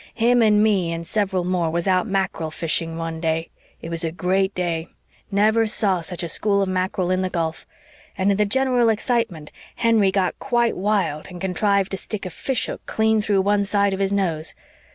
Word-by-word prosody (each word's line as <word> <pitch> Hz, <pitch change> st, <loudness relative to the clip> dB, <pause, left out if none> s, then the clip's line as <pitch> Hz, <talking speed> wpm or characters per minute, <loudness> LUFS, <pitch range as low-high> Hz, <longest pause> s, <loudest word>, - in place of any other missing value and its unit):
Him 240 Hz, +1 st, +3 dB
and 210 Hz, -1 st, +4 dB
me 195 Hz, -6 st, +2 dB
and 165 Hz, 0 st, -4 dB
several 190 Hz, -1 st, 0 dB
more 175 Hz, -2 st, 0 dB
was 170 Hz, +1 st, -1 dB
out 185 Hz, +2 st, +2 dB
mackerel 190 Hz, -5 st, -1 dB
fishing 165 Hz, +1 st, -2 dB
one 165 Hz, -1 st, -4 dB
day. 160 Hz, 0 st, -1 dB, 0.3 s
It 165 Hz, -, -5 dB
was 165 Hz, 0 st, +2 dB
a 165 Hz, -, -1 dB
great 190 Hz, +3 st, 0 dB
day 170 Hz, -2 st, -2 dB, 0.4 s
never 215 Hz, +2 st, +3 dB
saw 195 Hz, -4 st, +1 dB
such 175 Hz, +1 st, -4 dB
a -, -, -2 dB
school 200 Hz, +4 st, +1 dB
of -, -, -2 dB
mackerel 185 Hz, -1 st, -1 dB
in 185 Hz, 0 st, +1 dB
the 185 Hz, -, -1 dB
gulf 165 Hz, -2 st, -3 dB, 0.5 s
and 195 Hz, +1 st, +2 dB
in 195 Hz, -, +1 dB
the 210 Hz, -, +3 dB
general 250 Hz, 0 st, +2 dB
excitement 220 Hz, -, -1 dB, 0.2 s
Henry 225 Hz, -4 st, +3 dB
got 190 Hz, -2 st, 0 dB
quite 240 Hz, -3 st, +1 dB
wild 185 Hz, -6 st, -1 dB
and 180 Hz, -1 st, -9 dB
contrived 195 Hz, +1 st, +1 dB
to 195 Hz, -, -2 dB
stick 210 Hz, +1 st, -6 dB
a 185 Hz, -, -5 dB
fish 265 Hz, +6 st, -2 dB
hook -, -, -6 dB
clean 220 Hz, 0 st, +2 dB
through 205 Hz, -2 st, +2 dB
one 205 Hz, +1 st, +2 dB
side 200 Hz, 0 st, +1 dB
of 190 Hz, -, -3 dB
his 195 Hz, 0 st, 0 dB
nose. 170 Hz, -6 st, -1 dB
190 Hz, 200 wpm, -22 LUFS, 170-210 Hz, 0.5 s, and